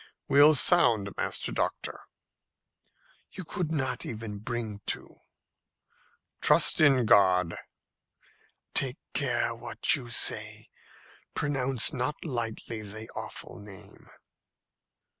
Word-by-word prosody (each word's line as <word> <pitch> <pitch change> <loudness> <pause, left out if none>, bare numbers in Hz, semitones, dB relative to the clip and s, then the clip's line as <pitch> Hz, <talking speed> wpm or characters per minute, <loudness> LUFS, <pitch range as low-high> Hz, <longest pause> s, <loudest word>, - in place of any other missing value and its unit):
"We'll 145 +2 +6
sound, 120 - +4
Master - - -3
Doctor." - - -3 1.3
"You 185 - -7
could 170 -1 -4
not 130 -5 -2
even 110 -2 -7
bring 110 -2 -5
to." - - -3 1.2
"Trust - - +5
in 135 -5 +4
God." 90 -4 +3 1.2
"Take 135 0 +1 0.2
care 120 -4 0
what 120 +7 0
you 125 -5 -8
say. 120 - +1 0.7
Pronounce 135 -2 +2
not 135 +5 -4
lightly 115 -4 -5
the 110 +2 -8
awful - - -8
name." 100 -2 -14
120 Hz, 95 wpm, -28 LUFS, 110-140 Hz, 1.3 s, We'll